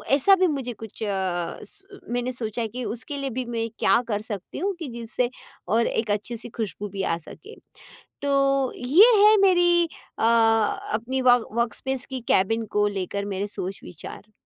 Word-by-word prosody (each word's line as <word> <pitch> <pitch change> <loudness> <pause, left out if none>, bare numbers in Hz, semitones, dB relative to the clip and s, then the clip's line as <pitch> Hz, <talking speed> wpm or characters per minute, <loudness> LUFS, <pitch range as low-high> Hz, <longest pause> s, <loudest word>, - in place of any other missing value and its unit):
ऐसा 390 +8 +6
भी 375 -1 +3
मुझे 270 -6 -3
कुछ 225 -1 -11
अ, 190 -4 -2
स 395 0 -9
मैंने 245 +1 -1
सोचा 235 -2 -4
है, 225 - -1
कि 250 +4 -6
उसके 245 +6 -5
लिए 275 -1 -3
भी 255 +1 -3
मैं 230 -1 -2
क्या 235 - +4
कर 210 -3 -1
सकती 205 -4 -6
हूँ? 395 +5 0
कि 325 - -5
जिससे 235 +1 -1 0.4
और 230 +2 +2
एक 220 -2 -1
अच्छी 210 +3 -2
सी 235 - -8
खुशबू 210 -2 -4
भी 195 0 -4
आ 165 - 0
सके। 380 - -11 0.7
तो, 275 -1 +2
ये 330 - +6
है 430 +1 +7
मेरी 350 -2 +5 0.3
अ, - - 0
अपनी 225 +2 +2
वर्क 245 -2 +5
वर्कस्पेस 240 +3 -2
की 260 -1 -5
केबिन 225 +4 +2
को 205 0 +4
लेकर 200 0 -3
मेरे 195 +2 -2
सोच-विचार। 195 0 -8
235 Hz, 175 wpm, -24 LUFS, 210-275 Hz, 0.7 s, है